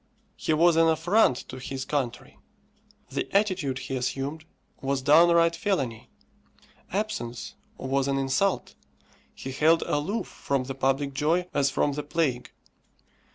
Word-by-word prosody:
He - - -2
was 165 +2 +4
an 165 0 +5
affront 165 - +3
to 130 - -7
his 130 0 -5
country. 130 -5 -3 0.7
The - - -3
attitude 185 -10 0
he 135 0 -4
assumed 135 +5 -3 0.4
was 135 -1 -1
downright 170 +3 +5
felony. 135 - -2 0.8
Absence 185 - -3 0.2
was 135 0 -1
an 140 0 0
insult. 135 +9 0 0.6
He 135 - -6
held 160 +5 +3
aloof 185 +10 -1
from 140 -2 -2
the 135 +1 -5
public 135 +1 0
joy 165 +6 +1
as 140 -1 +2
from 145 +2 +1
the 150 - -3
plague. 145 -5 -1
145 Hz, 130 wpm, -26 LUFS, 135-165 Hz, 0.8 s, an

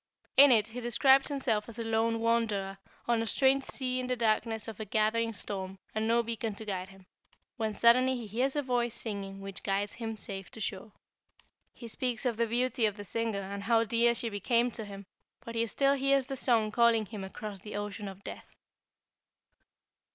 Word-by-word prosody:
In 280 0 +9
it 215 -2 +4
he 245 +3 -6
described 265 +3 +4
himself 240 -7 -1
as 230 - -9
a 230 - -3
lone 225 0 +1
wanderer 215 -4 0 0.3
on 235 -1 +2
a 225 - -2
strange 270 +3 +3
sea 255 -1 -1
in 255 - -3
the 250 - 0
darkness 225 -1 0
of 220 -3 -7
a - - -2
gathering 220 +2 +1
storm 190 -2 -5 0.2
and 220 0 -1
no 235 +1 +3
beacon 225 -2 -3
to 220 - -8
guide 190 -2 -3
him, 195 -1 -17 0.5
when 220 -1 -1
suddenly 255 +3 +5
he 235 - -6
hears 250 +7 -1
a 290 - 0
voice 240 -3 0
singing 200 -4 -5
which 195 -1 -7
guides 200 +1 -1
him 225 -2 -5
safe 195 -2 -6
to - - -10
shore. 210 0 -4 0.8
He 235 - -10
speaks 245 +1 -1
of 235 -3 0
the 235 0 +1
beauty 240 0 +1
of 210 0 -4
the 205 - -7
singer 225 -1 -2
and 200 +1 -6
how 230 +2 +3
dear 235 +1 +3
she 230 - -2
became 235 +4 +1
to 220 - -5
him, 200 -1 -9 0.4
but 230 - -6
he 230 0 0
still 275 +5 +2
hears 275 -1 +2
the 270 - -4
song 230 -4 +2
calling 230 -1 +4
him 205 -1 -7
across 200 +1 -7
the 210 +3 -8
ocean 205 0 -4
of 195 0 -9
death." - - -9
225 Hz, 200 wpm, -30 LUFS, 205-240 Hz, 0.8 s, In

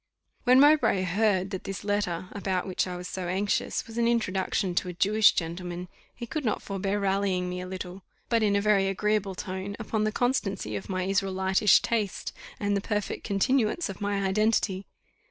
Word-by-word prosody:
When 255 +1 +6
Mowbray 275 -10 +5
heard 190 0 +1
that 190 - -5
this 195 0 -5
letter, 195 -4 -1
about 190 -3 -2
which 185 0 -1
I 180 - -4
was 180 0 -6
so 185 -1 -4
anxious, 190 +3 -1
was 230 +1 -6
an 235 - +3
introduction 195 -5 0
to 180 - 0
a - - -5
Jewish 210 +4 +4
gentleman, 175 +1 -4 0.3
he 240 - -6
could 305 +5 -4
not 215 -4 -1
forbear 195 +1 -2
rallying 195 -2 0
me 180 0 -4
a 180 - -6
little, 185 0 -6 0.3
but 230 -1 +2
in 205 -2 +3
a 200 - +2
very 200 -2 +3
agreeable 200 0 0
tone, 190 +1 -5
upon 220 -1 -2
the 215 - +1
constancy 200 - -1
of 100 - -6
my 185 -1 -1
Israelitish 190 +1 +3
taste, 215 -4 -2 0.3
and 205 0 0
the 200 - 0
perfect 210 0 -3
continuance 225 - +1
of 195 - -8
my 200 -1 0
identity. 195 -1 +1
195 Hz, 185 wpm, -27 LUFS, 185-215 Hz, 0.3 s, When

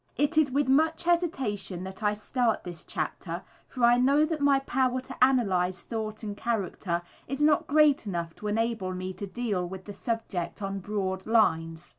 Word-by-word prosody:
It 290 +3 +1
is 310 -2 +4
with 280 +1 +1
much 315 +5 +3
hesitation 265 - 0
that 190 +3 -8
I 210 0 +1
start 230 +1 0
this 175 -3 -7
chapter, - - -4 0.2
for 250 - -5
I 240 +1 +6
know 280 +4 +4
that 310 -1 -3
my 285 -1 +5
power 255 -1 0
to 255 0 -1
analyze 185 -9 +2
thought 220 -1 -4
and 205 -1 -4
character 195 -6 -2 0.2
is 275 +2 -4
not 295 0 +3
great 295 -5 +4
enough 170 -3 -3
to 210 - -5
enable 220 -3 -1
me 185 +1 -4
to 200 - -6
deal 205 -3 -2
with 190 0 -8
the 205 - -7
subject 220 -7 -3
on 195 0 -3
broad 190 -1 -3
lines. 165 -7 +2
225 Hz, 180 wpm, -28 LUFS, 190-270 Hz, 0.2 s, I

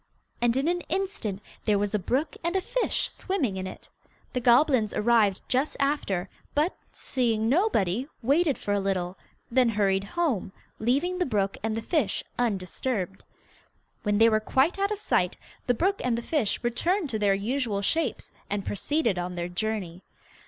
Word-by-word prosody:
And 240 +1 +3
in 275 +3 +1
an 350 +1 +1
instant 370 - -2 0.2
there 210 -2 +3
was 205 +1 -1
a 210 - +2
brook 270 - -1
with 340 +2 0
a - - +4
fish - - 0
swimming 295 - -1
in 190 0 -3
it. - - -10 0.5
The 250 - 0
goblins 245 -2 +4
arrived 215 -3 +3
just 265 +4 0
after, 275 -10 0 0.3
but, 305 +5 +2 0.2
seeing 230 -4 0
nobody, 255 - +2 0.2
waited 290 +3 +3
for 205 - -2
a 205 - +2
little, 190 -2 -1 0.4
then 250 -1 +4
hurried 195 -3 +2
home, 235 - -1 0.3
leaving 285 +11 +1
the 360 - +2
brook 200 -5 0
and 220 +1 -1
the 225 - -3
fish 280 - 0 0.2
undisturbed. 195 -2 -1 0.8
When 210 -1 +1
they 225 +2 +7
were 215 -1 +4
quite 270 - +2
out 395 0 +2
of 425 - -2
sight, 180 - +1 0.3
the 245 - +3
brook 390 - +1
and 245 -2 +1
the 235 - -4
fish 265 -10 0
returned 330 - 0
to 220 - -1
their 200 -2 +3
usual 215 -1 -1
shapes 325 +11 -1 0.2
and 200 -1 -2
proceeded 230 - 0
on 180 0 -3
their 175 0 -3
journey. 185 -2 -3
230 Hz, 170 wpm, -27 LUFS, 200-290 Hz, 0.8 s, they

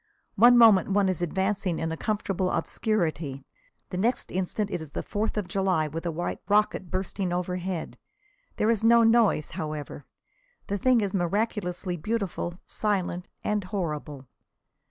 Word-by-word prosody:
One 240 +4 +7
moment 220 -5 +7
one 200 0 +3
is 180 -2 -1
advancing 190 +1 0
in 160 0 -2
a - - -2
comfortable 195 -1 -1
obscurity. 160 - -1 0.5
The 180 - -3
next 235 +5 0
instant 190 +3 -2
it 175 - -2
is 150 -2 -10
the - - -3
Fourth 215 +1 -2
of 205 -4 -1
July, 185 -6 +1
with 165 +3 -5
a - - 0
white 175 +2 -3
rocket 205 -3 +2
bursting 185 0 -2
overhead. 180 0 -3 0.6
There 220 - +2
is 225 -2 -1
no 235 0 +6
noise, 225 -8 +3
however. 150 -2 -6 0.6
The 200 0 -2
thing 250 +1 +4
is 200 -2 -2
miraculously 185 -1 -1
beautiful, 195 -2 -3
silent 185 -4 -1 0.2
and 210 -1 0
horrible. 150 -7 -4
190 Hz, 150 wpm, -27 LUFS, 170-210 Hz, 0.6 s, One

